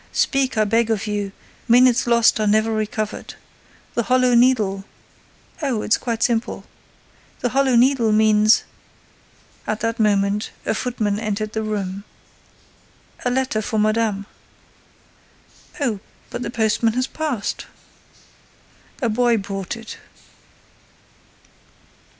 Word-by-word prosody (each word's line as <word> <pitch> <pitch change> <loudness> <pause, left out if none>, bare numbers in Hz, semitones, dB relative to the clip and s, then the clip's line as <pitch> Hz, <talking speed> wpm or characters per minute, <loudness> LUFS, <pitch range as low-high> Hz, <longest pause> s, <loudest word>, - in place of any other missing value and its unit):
Speak, 270 -3 +1
I 215 - +4
beg 225 +2 +1
of 220 -2 0
you: 205 -2 -2 0.4
minutes 245 0 +5
lost 235 -2 +4
are 215 - +1
never 220 +2 +2
recovered. 215 0 -3 0.6
The 235 - +1
Hollow 255 +1 +2
Needle—" 225 -6 +3 0.8
"Oh, 255 -7 -1
it's 215 - +2
quite 230 -2 -2
simple. 235 -2 0 0.8
The 245 - +1
Hollow 265 0 +2
Needle 240 -2 +4
means—" 215 0 +4 1.0
At 215 - -2
that 230 +1 -1
moment, 205 -1 +1 0.2
a - - +1
footman 215 -3 -1
entered 215 -1 -3
the 220 - -1
room: 200 -2 -3 1.2
"A - - +3
letter 255 -3 0
for 220 +1 -3
madame." 215 -1 +1 1.5
"Oh, 240 -8 -1 0.3
but 245 - -5
the - - -3
postman 225 -1 +1
has 255 +2 0
passed!" 285 -8 -3 1.4
"A - - +3
boy 235 +1 +2
brought 195 +1 -4
it." 225 -1 -9
220 Hz, 115 wpm, -21 LUFS, 210-245 Hz, 1.5 s, minutes